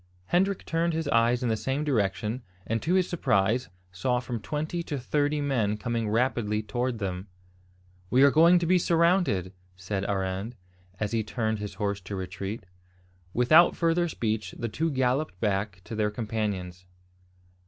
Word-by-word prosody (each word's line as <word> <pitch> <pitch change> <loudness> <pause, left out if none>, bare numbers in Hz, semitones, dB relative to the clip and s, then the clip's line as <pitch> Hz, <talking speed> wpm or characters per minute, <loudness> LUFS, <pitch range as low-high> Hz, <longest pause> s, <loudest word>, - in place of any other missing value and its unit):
Hendrik 190 +2 +1
turned 165 +1 0
his 160 -1 -2
eyes 120 +1 +3
in 120 - +1
the 110 - +2
same 135 +6 -2
direction, 110 -2 0 0.2
and 115 0 -1
to 175 +4 +1
his 185 -1 +3
surprise 115 - +1 0.2
saw 125 +7 0
from 120 -1 -4
twenty 155 +7 -3
to 150 -3 -4
thirty 145 +3 0
men 115 -7 0
coming 115 +1 -2
rapidly 110 -2 0
towards 120 +3 -2
them. 95 -2 -4 0.8
"We 130 +2 +5
are 140 - +7
going 170 +4 +6
to 175 - 0
be 180 +2 +4
surrounded!" 170 - +2 0.2
said 95 +2 -3
Arend, 95 +3 -2 0.4
as 105 -1 -1
he 115 -1 0
turned 110 +1 -2
his 105 -1 -6
horse 100 0 -2
to 95 +2 -6
retreat. 95 +2 -5 0.7
Without 140 - +5
further 170 +1 +2
speech, 110 -6 -2
the 115 - -3
two 160 +9 -1
galloped 130 - 0
back 100 -2 -1
to 115 - -9
their 105 -1 +1
companions. 105 -5 -4
115 Hz, 160 wpm, -27 LUFS, 105-145 Hz, 0.8 s, are